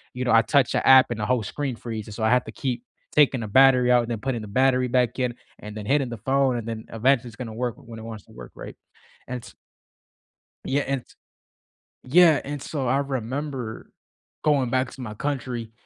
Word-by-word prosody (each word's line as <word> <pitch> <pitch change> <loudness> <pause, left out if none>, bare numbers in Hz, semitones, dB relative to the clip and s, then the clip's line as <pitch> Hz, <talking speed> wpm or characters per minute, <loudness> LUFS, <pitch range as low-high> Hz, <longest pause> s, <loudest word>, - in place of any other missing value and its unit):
you 125 0 -3
know, 125 - +1
I 115 0 +7
touch 135 +1 +2
a - - 0
app 130 -2 +7
and 110 - -3
the 105 - -1
whole 125 -3 +1
screen 135 +4 -4
freezes, 110 -3 -7
so 110 - -4
I 110 - +3
had 125 0 +3
to - - -8
keep 125 -3 -3 0.3
taking 135 -5 +3
a - - -4
battery 130 0 +5
out, 120 -1 +5
and 115 - -7
then 115 - -2
putting 125 -4 -2
the 105 - -8
battery 130 +3 +2
back 125 0 +1
in, 125 -2 -1 0.2
and 105 0 -9
then 105 - -6
hitting 135 +1 +2
the 120 - -6
phone. 135 +2 +1
and 115 - -5
then 110 -1 -5
eventually 125 +2 +2
it's 115 - -14
gonna 115 -4 -6
work 120 0 -3
when 115 -1 -11
it - - -9
wants 110 -2 -8
to - - -20
work, 60 0 -11
right, - - -9 0.5
and 125 -1 -5
t - - -13 1.1
Yeah 140 +2 +1
and 135 -2 -2
t - - -21 0.9
yeah, 160 +3 +5
and 145 0 -5
so, 135 -3 -4
I 135 +3 +2
remember 130 -2 -4 0.5
going 140 -5 +2
back 130 -1 +1
to 130 - -10
my 105 -3 -6
country 120 -3 -4
125 Hz, 225 wpm, -24 LUFS, 115-135 Hz, 1.1 s, I